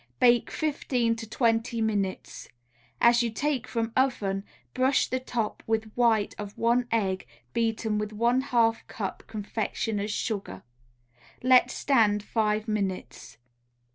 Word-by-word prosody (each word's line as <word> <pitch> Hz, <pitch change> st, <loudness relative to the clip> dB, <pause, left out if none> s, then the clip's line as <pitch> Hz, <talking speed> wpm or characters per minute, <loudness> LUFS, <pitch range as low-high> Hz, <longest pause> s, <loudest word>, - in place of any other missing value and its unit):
Bake 240 Hz, -1 st, +4 dB
fifteen 255 Hz, -6 st, 0 dB
to 225 Hz, -1 st, -8 dB
twenty 230 Hz, 0 st, +1 dB
minutes. 205 Hz, -4 st, -2 dB, 0.5 s
As 235 Hz, 0 st, +5 dB
you 235 Hz, -, 0 dB
take 260 Hz, +1 st, -2 dB
from 225 Hz, -1 st, -2 dB
oven, 205 Hz, -7 st, +1 dB, 0.3 s
brush 260 Hz, +2 st, +2 dB
the 255 Hz, -, -1 dB
top 240 Hz, -4 st, -3 dB
with 220 Hz, -1 st, -1 dB
white 230 Hz, -4 st, +2 dB
of 205 Hz, -1 st, -7 dB
one 240 Hz, +1 st, +2 dB
egg 190 Hz, -, 0 dB, 0.3 s
beaten 225 Hz, -2 st, 0 dB
with 210 Hz, 0 st, -3 dB
one 235 Hz, +4 st, +2 dB
half 230 Hz, -4 st, +1 dB
cup 200 Hz, -4 st, -5 dB
confectioners' 210 Hz, 0 st, -3 dB
sugar. 200 Hz, -, -3 dB, 0.8 s
Let 255 Hz, 0 st, +6 dB
stand 215 Hz, -6 st, +2 dB
five 215 Hz, 0 st, 0 dB
minutes. 200 Hz, -4 st, -4 dB
225 Hz, 125 wpm, -27 LUFS, 210-240 Hz, 0.8 s, Let